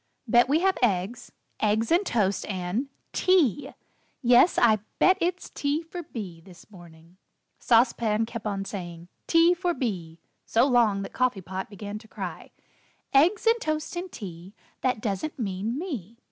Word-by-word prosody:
"Bet 240 +3 +4
we 310 +4 +3
have 380 0 +2
eggs, 205 0 0 0.3
eggs, 220 +1 +1
and 350 +4 +4
toast, 205 - 0
and 195 +7 -2 0.2
tea! 325 - +2 0.5
Yes, 245 +7 +5
I 220 -3 +5 0.2
bet 375 - +5
it's 355 +1 -2
tea 290 +3 -1
for 350 +2 -7
B. 200 - -8
this 180 +2 -16
morning." 170 -2 -16 0.4
Sauce 235 +1 +4
Pan 220 -1 0
kept 225 -1 -6
on 195 -1 -3
saying, 175 -3 -7 0.2
"Tea 335 +1 +5
for 355 -1 -1
B." 175 -10 -4 0.2
so 230 - +3
long 230 -7 +3
that - - -8
Coffee 250 -6 0
Pot 190 +2 -6
began 205 0 -7
to 220 - -17
cry: - - -7 0.6
"Eggs 330 +12 +4
and 455 +1 +3
toast 310 +2 -2
and 355 +1 -5
tea, 185 0 -9 0.3
That 250 -4 0
doesn't 210 +10 -3
mean 215 +1 -3
me. 240 - -6
225 Hz, 160 wpm, -26 LUFS, 195-295 Hz, 0.6 s, Yes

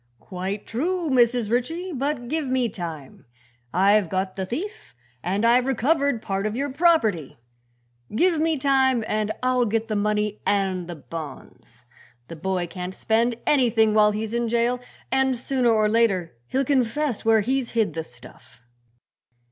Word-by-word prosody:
"Quite 190 +2 -5
true, 330 +6 -2
Mrs. 240 -3 +3
Ritchie; 325 +10 -1
but 275 -2 -2
give 310 +1 -2
me 255 -2 +1
time. 165 -8 -8 0.5
I've 200 0 +3
got 190 +1 -2
the 190 -1 -4
thief, 340 - -6 0.3
and 195 - -1
I've 245 +2 +4
recovered 270 -1 +1
part 195 +1 -1
of 215 - -4
your 280 +2 -2
property! 260 - +2 0.8
Give 345 +4 +3
me 320 -1 +1
time 265 -3 +2
and 215 0 -1
I'll 255 -1 +2
get 225 +1 -1
the 215 - -1
money 210 0 -1
and 190 -3 0
the 175 - -6
bonds. 140 -6 -10 0.4
The 165 - -7
boy 185 +2 -2
can't 180 +1 -6
spend 230 +1 +1
anything 230 -6 +3
while 210 -1 +5
he's 215 +1 -3
in 235 -1 0
jail 235 +2 +1 0.3
and 265 -1 +2
sooner 255 0 0
or 215 -2 +3
later 210 - +1
he'll 270 +1 0
confess 265 -1 0
where 225 -1 +4
he's 255 +3 -1
hid 220 -8 +1
the 160 +1 -3
stuff." 125 -2 -15
225 Hz, 155 wpm, -24 LUFS, 195-260 Hz, 0.8 s, while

